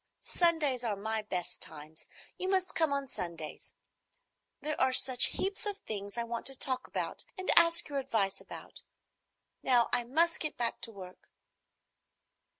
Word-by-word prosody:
"Sundays 310 Hz, -8 st, +1 dB
are 220 Hz, -3 st, -1 dB
my 220 Hz, +2 st, -2 dB
best 185 Hz, -4 st, -5 dB
times. 155 Hz, 0 st, -6 dB, 0.3 s
You 370 Hz, -, -4 dB
must 375 Hz, -1 st, +1 dB
come 320 Hz, -3 st, +1 dB
on 280 Hz, -1 st, -2 dB
Sundays. 170 Hz, -9 st, -6 dB, 0.9 s
There 305 Hz, 0 st, -3 dB
are 260 Hz, 0 st, +3 dB
such 255 Hz, -1 st, +7 dB
heaps 395 Hz, +2 st, 0 dB
of 410 Hz, -1 st, -1 dB
things 200 Hz, -, -7 dB
I 235 Hz, -, 0 dB
want 235 Hz, 0 st, -4 dB
to 270 Hz, -, -1 dB
talk 255 Hz, -1 st, 0 dB
about -, -, -3 dB
and 375 Hz, -, -1 dB
ask 335 Hz, 0 st, +6 dB
your 285 Hz, -1 st, -3 dB
advice 220 Hz, -8 st, -1 dB
about. -, -, -9 dB, 0.8 s
Now 245 Hz, -2 st, +3 dB
I 245 Hz, -, +2 dB
must 330 Hz, +7 st, +1 dB
get 305 Hz, -, -4 dB
back 235 Hz, -1 st, -1 dB
to 230 Hz, -, -2 dB
work." 185 Hz, -3 st, -12 dB
255 Hz, 155 wpm, -31 LUFS, 210-315 Hz, 0.9 s, such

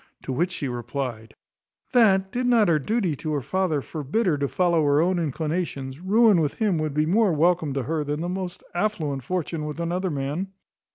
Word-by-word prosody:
To 130 Hz, -, -3 dB
which 175 Hz, +8 st, +1 dB
she 150 Hz, -6 st, -4 dB
replied, 120 Hz, -2 st, -5 dB, 0.6 s
"That, 195 Hz, -6 st, +4 dB
did 250 Hz, 0 st, -1 dB
not 230 Hz, -6 st, +4 dB
her 155 Hz, -2 st, +3 dB
duty 190 Hz, -, 0 dB
to 155 Hz, +2 st, -3 dB
her 145 Hz, -, 0 dB
father 165 Hz, -1 st, -1 dB
forbid 155 Hz, -, -2 dB
her 175 Hz, -5 st, +3 dB
to 140 Hz, -, 0 dB
follow 170 Hz, 0 st, +2 dB
her 145 Hz, 0 st, +3 dB
own 180 Hz, +2 st, +2 dB
inclinations, 150 Hz, -3 st, -3 dB
ruin 205 Hz, 0 st, +4 dB
with 150 Hz, -2 st, -1 dB
him 205 Hz, -7 st, +1 dB
would 155 Hz, -2 st, -2 dB
be 150 Hz, 0 st, +2 dB
more 200 Hz, +4 st, +3 dB
welcome 160 Hz, -1 st, +2 dB
to 135 Hz, -, -1 dB
her 155 Hz, +3 st, -1 dB
than 145 Hz, +1 st, -3 dB
the 175 Hz, -, -2 dB
most 180 Hz, 0 st, -5 dB
affluent 175 Hz, -8 st, -1 dB
fortune 165 Hz, +2 st, -3 dB
with 150 Hz, +2 st, -5 dB
another 180 Hz, +3 st, -1 dB
man." 145 Hz, +5 st, -2 dB
165 Hz, 195 wpm, -24 LUFS, 145-185 Hz, 0.6 s, That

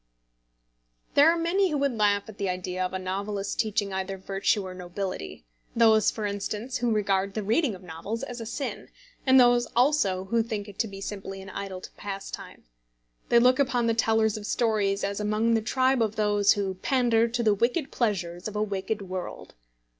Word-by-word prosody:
There 295 Hz, +3 st, +7 dB
are 340 Hz, -, 0 dB
many 365 Hz, +4 st, +2 dB
who 300 Hz, -, 0 dB
would 275 Hz, -3 st, 0 dB
laugh 205 Hz, -2 st, +2 dB
at 220 Hz, -, -12 dB
the 200 Hz, -2 st, -1 dB
idea 180 Hz, 0 st, -3 dB
of 185 Hz, -, -2 dB
a 190 Hz, -, -2 dB
novelist 195 Hz, +2 st, -3 dB
teaching 210 Hz, -2 st, 0 dB
either 190 Hz, 0 st, -3 dB
virtue 195 Hz, +1 st, 0 dB
or 185 Hz, -, -6 dB
nobility, 180 Hz, -, -6 dB, 0.3 s
those, 220 Hz, -2 st, +5 dB
for 215 Hz, -, -4 dB
instance, 205 Hz, +4 st, -3 dB
who 240 Hz, 0 st, 0 dB
regard 200 Hz, -2 st, +1 dB
the 215 Hz, -, -2 dB
reading 225 Hz, -, +1 dB
of 185 Hz, -, -14 dB
novels 180 Hz, +7 st, -5 dB
as 245 Hz, -1 st, -6 dB
a 225 Hz, -, -6 dB
sin, 275 Hz, +4 st, -5 dB, 0.4 s
and 260 Hz, 0 st, +7 dB
those 245 Hz, -1 st, +5 dB
also 240 Hz, -8 st, +3 dB
who 230 Hz, +4 st, +1 dB
think 215 Hz, -2 st, -4 dB
it 205 Hz, -, -12 dB
to 225 Hz, -, +1 dB
be 195 Hz, -1 st, -9 dB
simply 195 Hz, -1 st, -6 dB
an 190 Hz, 0 st, -9 dB
idle 190 Hz, -2 st, -6 dB
pastime. 195 Hz, -1 st, -7 dB, 0.7 s
They 235 Hz, -, +5 dB
look 255 Hz, +3 st, +5 dB
upon 250 Hz, -3 st, +2 dB
the 230 Hz, -, +2 dB
tellers 220 Hz, -1 st, +2 dB
of 210 Hz, 0 st, -7 dB
stories 210 Hz, -4 st, +1 dB
as 200 Hz, 0 st, -2 dB
among 215 Hz, +2 st, +1 dB
the 225 Hz, -, +2 dB
tribe 260 Hz, +3 st, +2 dB
of 220 Hz, -1 st, 0 dB
those 205 Hz, -1 st, +3 dB
who 195 Hz, -2 st, -2 dB
pander 235 Hz, +2 st, +2 dB
to 235 Hz, +1 st, -2 dB
the 215 Hz, -2 st, +4 dB
wicked 245 Hz, -, 0 dB
pleasures 185 Hz, -6 st, -1 dB
of 215 Hz, -, -7 dB
a 210 Hz, -, +1 dB
wicked 200 Hz, +1 st, -3 dB
world. 185 Hz, -1 st, -6 dB
210 Hz, 190 wpm, -27 LUFS, 195-235 Hz, 0.7 s, There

